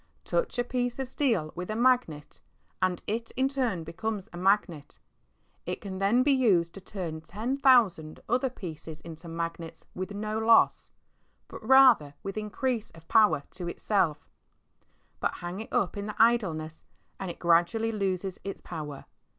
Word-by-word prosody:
Touch -, -, -1 dB
a 245 Hz, -, +2 dB
piece 245 Hz, 0 st, -2 dB
of 265 Hz, -1 st, -3 dB
steel 230 Hz, -, 0 dB
with 180 Hz, +2 st, -6 dB
a 215 Hz, -, -2 dB
magnet, 235 Hz, -12 st, +1 dB, 0.4 s
and 185 Hz, -2 st, 0 dB
it 225 Hz, +2 st, -3 dB
in 265 Hz, +1 st, +3 dB
turn 250 Hz, -11 st, -1 dB
becomes 200 Hz, +4 st, -4 dB
a -, -, -7 dB
magnet. 180 Hz, -5 st, 0 dB, 0.7 s
It -, -, -3 dB
can 190 Hz, -2 st, -6 dB
then 215 Hz, +6 st, +3 dB
be 290 Hz, -, +3 dB
used 195 Hz, -11 st, +3 dB
to 195 Hz, -, -10 dB
turn 175 Hz, -5 st, -6 dB
ten 215 Hz, +11 st, -3 dB
thousand 230 Hz, -, +3 dB
other 255 Hz, +2 st, +1 dB
pieces 165 Hz, -8 st, -8 dB
into 165 Hz, +1 st, -10 dB
magnets 165 Hz, 0 st, -5 dB
with 185 Hz, +1 st, -5 dB
no 215 Hz, +1 st, -3 dB
loss, 225 Hz, 0 st, +4 dB, 0.6 s
but -, -, -10 dB
rather 235 Hz, -, +6 dB
with 195 Hz, -, -5 dB
increase 220 Hz, +2 st, -2 dB
of 165 Hz, 0 st, -17 dB
power 210 Hz, -10 st, +4 dB
to 180 Hz, -2 st, -6 dB
itself. 170 Hz, -5 st, 0 dB, 0.9 s
But -, -, -1 dB
hang 175 Hz, +3 st, -6 dB
it 220 Hz, -, -8 dB
up 185 Hz, -, 0 dB
in 205 Hz, +1 st, -4 dB
idleness, 175 Hz, -9 st, +1 dB, 0.4 s
and 190 Hz, -, -4 dB
it 170 Hz, -, -7 dB
gradually 175 Hz, +7 st, +2 dB
loses 195 Hz, -3 st, -2 dB
its 195 Hz, -, -5 dB
power. 150 Hz, -5 st, -7 dB
195 Hz, 160 wpm, -28 LUFS, 170-230 Hz, 0.9 s, rather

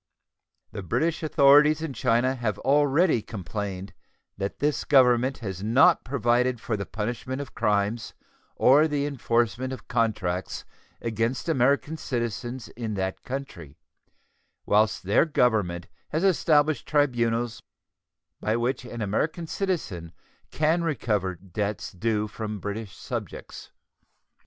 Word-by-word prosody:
The -, -, -6 dB
British 160 Hz, -, 0 dB
authorities 150 Hz, 0 st, +5 dB
in 155 Hz, -4 st, -4 dB
China 120 Hz, +2 st, +2 dB
have 115 Hz, -5 st, -2 dB
already 145 Hz, -, +3 dB
complained 100 Hz, -1 st, -5 dB, 0.4 s
that 100 Hz, 0 st, -4 dB
this 150 Hz, 0 st, 0 dB
Government 130 Hz, -1 st, +4 dB
has 95 Hz, -2 st, -4 dB
not 115 Hz, +6 st, +4 dB
provided 125 Hz, -1 st, +1 dB
for 110 Hz, -, -2 dB
the 100 Hz, -2 st, -4 dB
punishment 120 Hz, +5 st, -4 dB
of 140 Hz, -3 st, -7 dB
crimes 105 Hz, +1 st, 0 dB, 0.4 s
or 145 Hz, +5 st, +5 dB
the 145 Hz, -2 st, -1 dB
enforcement 125 Hz, -2 st, 0 dB
of 130 Hz, -, -8 dB
contracts 105 Hz, -8 st, -1 dB, 0.4 s
against 115 Hz, +5 st, -1 dB
American 140 Hz, +2 st, +2 dB
citizens 120 Hz, -3 st, -4 dB
in 115 Hz, -3 st, -5 dB
that 95 Hz, -1 st, -3 dB
country, 105 Hz, -, -7 dB, 0.9 s
whilst 105 Hz, +1 st, +2 dB
their 100 Hz, +3 st, +4 dB
Government 110 Hz, -, +1 dB, 0.2 s
has 160 Hz, +4 st, -1 dB
established 155 Hz, -6 st, +3 dB
tribunals 120 Hz, -5 st, +1 dB, 0.8 s
by 110 Hz, +1 st, 0 dB
which 120 Hz, +2 st, -1 dB
an 120 Hz, -2 st, -5 dB
American 155 Hz, -, -1 dB
citizen 155 Hz, -, -3 dB, 0.4 s
can 160 Hz, +3 st, +1 dB
recover 105 Hz, -, -1 dB
debts 100 Hz, +4 st, -4 dB
due 105 Hz, +2 st, -1 dB
from 105 Hz, -1 st, -5 dB
British 105 Hz, 0 st, -6 dB
subjects. -, -, -7 dB
120 Hz, 120 wpm, -26 LUFS, 105-140 Hz, 0.9 s, authorities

